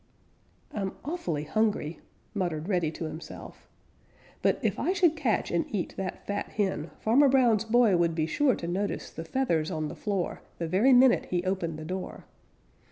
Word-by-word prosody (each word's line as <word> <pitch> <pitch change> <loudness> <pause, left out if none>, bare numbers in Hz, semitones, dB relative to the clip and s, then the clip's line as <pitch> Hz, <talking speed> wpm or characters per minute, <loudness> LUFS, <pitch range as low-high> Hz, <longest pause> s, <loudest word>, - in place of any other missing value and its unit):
"I'm 195 -2 -2
awfully 180 - -2
hungry," 205 -3 0 0.3
muttered 175 -6 -2
Reddy 180 -6 +1
to - - -6
himself, 160 +1 -9 0.7
"but - - +3
if - - 0
I 370 - +1
should 345 -4 +3
catch 250 - 0
and 170 - +2
eat 200 -5 -3
that 190 -1 -5
fat 205 0 -2
hen, 190 -6 -1
Farmer 270 +6 +4
Brown's 240 -5 +4
boy 225 -3 +4
would 170 -1 +2
be 155 -1 +1
sure 260 - +2
to 170 - -6
notice 195 +4 -2
the 165 - -6
feathers 165 -6 0
on 155 -4 -2
the - - -7
floor 195 -4 -2 0.2
the 165 - -3
very 195 +11 +4
minute 255 0 +6
he 175 -1 -1
opened 185 -4 -2
the 155 - -7
door. 185 +3 -5
190 Hz, 170 wpm, -28 LUFS, 165-230 Hz, 0.7 s, minute